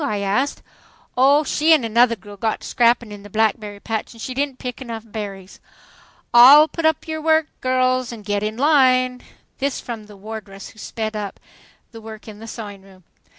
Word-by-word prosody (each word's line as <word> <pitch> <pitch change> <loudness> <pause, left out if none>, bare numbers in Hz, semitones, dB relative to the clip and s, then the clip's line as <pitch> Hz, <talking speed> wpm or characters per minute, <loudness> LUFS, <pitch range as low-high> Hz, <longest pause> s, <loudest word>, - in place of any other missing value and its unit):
I 215 -7 -1
asked. 230 +9 -1 0.5
"Oh, 280 +4 +4
she 310 +2 +3
an' 305 -6 +3
another 230 +1 +3
girl 205 0 -13
got 220 +2 -2
to - - -8
scrapping 235 -2 +2
in 205 -1 -9
the 205 - -12
blackberry 215 -1 -1
patch 220 +2 -4
and 230 - -16
she 255 - -5
didn't 275 0 -2
pick 250 0 -7
enough 230 -3 -6
berries. 200 -3 -8 0.4
." - - -26 0.3
"All 275 +6 +9
put 325 0 -1
up 315 0 -1
your 315 0 -4
work, 315 0 +3 0.2
girls, 255 -1 +1
and 220 -3 -10
get 205 0 -1
in 215 +1 -3
line." 255 -3 +3 0.4
This 275 -1 -1
from 225 -3 -7
the 205 -1 -14
wardress, 205 -1 -9
who 215 - -17
sped 220 0 -5
up 205 -2 -5 0.5
the 225 -2 -11
work 220 0 -11
in 210 -1 -10
the 225 - -10
sewing 205 -4 -8
room. 190 -1 -19
230 Hz, 195 wpm, -21 LUFS, 210-255 Hz, 0.5 s, All